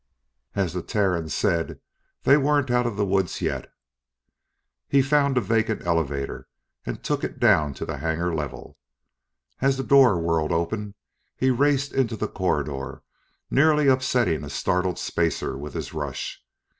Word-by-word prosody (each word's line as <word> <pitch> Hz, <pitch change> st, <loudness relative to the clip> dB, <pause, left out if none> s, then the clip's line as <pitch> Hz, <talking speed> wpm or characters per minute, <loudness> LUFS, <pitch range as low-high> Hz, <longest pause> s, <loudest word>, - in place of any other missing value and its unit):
As 95 Hz, -5 st, 0 dB
the 90 Hz, -, -2 dB
Terrans 90 Hz, -5 st, 0 dB
said, 85 Hz, +1 st, 0 dB, 0.4 s
they 140 Hz, -, +6 dB
weren't 145 Hz, -2 st, +2 dB
out 125 Hz, 0 st, +2 dB
of 115 Hz, -, -3 dB
the 105 Hz, -, +1 dB
woods 95 Hz, -2 st, 0 dB
yet. -, -, -3 dB, 1.2 s
He 140 Hz, -1 st, +4 dB
found 140 Hz, -1 st, +2 dB
a -, -, +4 dB
vacant 110 Hz, 0 st, 0 dB
elevator 75 Hz, -5 st, -1 dB, 0.4 s
and -, -, -5 dB
took -, -, -1 dB
it -, -, -4 dB
down 75 Hz, -3 st, +3 dB
to -, -, -5 dB
the 80 Hz, -, -4 dB
hangar 80 Hz, +4 st, -1 dB
level. 75 Hz, -2 st, -6 dB, 0.8 s
As 135 Hz, 0 st, +2 dB
the 135 Hz, -, -2 dB
door 130 Hz, -9 st, +5 dB
whirled 80 Hz, -2 st, 0 dB
open, 100 Hz, +5 st, -2 dB, 0.4 s
he 130 Hz, 0 st, +2 dB
raced 140 Hz, +2 st, +1 dB
into 125 Hz, -4 st, +1 dB
the -, -, -2 dB
corridor, 75 Hz, -7 st, -2 dB, 0.5 s
nearly 150 Hz, 0 st, +4 dB
upsetting 125 Hz, -, +2 dB
a 70 Hz, -, -7 dB
startled 90 Hz, +4 st, 0 dB
spacer 80 Hz, -5 st, -1 dB
with 70 Hz, +1 st, -7 dB
his -, -, -5 dB
rush. -, -, -5 dB
100 Hz, 150 wpm, -24 LUFS, 80-130 Hz, 1.2 s, they